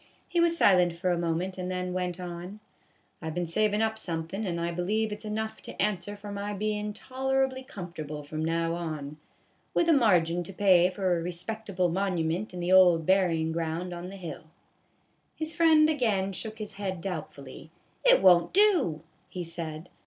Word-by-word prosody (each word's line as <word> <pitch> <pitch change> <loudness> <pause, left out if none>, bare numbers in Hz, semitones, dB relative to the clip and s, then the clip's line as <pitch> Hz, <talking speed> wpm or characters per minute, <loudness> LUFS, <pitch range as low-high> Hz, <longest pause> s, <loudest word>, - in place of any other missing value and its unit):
He 345 - 0
was 340 0 +3
silent 180 - +4
for 180 +1 0
a 175 - +1
moment, 175 +3 -2
and 180 0 -3
then 180 0 -3
went 180 -1 -2
on: 180 +3 -7 0.6
"I 160 - -4
've 160 - -6
been 175 0 -1
savin' 210 +5 +1
up 220 0 -1
somethin', 170 +3 -4
and 170 -1 -2
I 170 0 -1
believe 210 +6 -1
it 210 +1 -6
's - - -9
enough 220 +1 -4
to - - -10
answer 205 -1 -1
for 205 0 -8
my 200 +1 -4
bein' 210 +1 -2
toler 265 +4 0
ably 260 0 -6
comfortable 165 - -7
from 155 +2 -4
now 165 +1 0
on, 155 -4 -5 0.6
with 340 - +3
a 330 - +6
margin 175 - +3
to 175 +3 -7
pay 185 -2 +5
for 185 -3 0
a - - -4
respectable 185 +2 -2
monument 180 +1 -1
in 180 -1 -6
the 175 +1 -1
old 175 -4 +6
buryin' 170 -4 +2
ground 165 +2 -3
on 175 +1 -6
the 195 - -9
hill." 170 -5 -8 0.9
His 315 0 -3
friend 320 -2 +5
again 215 -10 +1
shook 220 +3 -6
his 215 -1 -7
head 190 -3 -2
doubtfully. 155 -5 -7 0.2
" - - -39
It - - +5
won't 175 -2 +6
do," 345 - +3 0.3
he 180 - -5
said. 165 0 -7
185 Hz, 190 wpm, -28 LUFS, 170-215 Hz, 0.9 s, a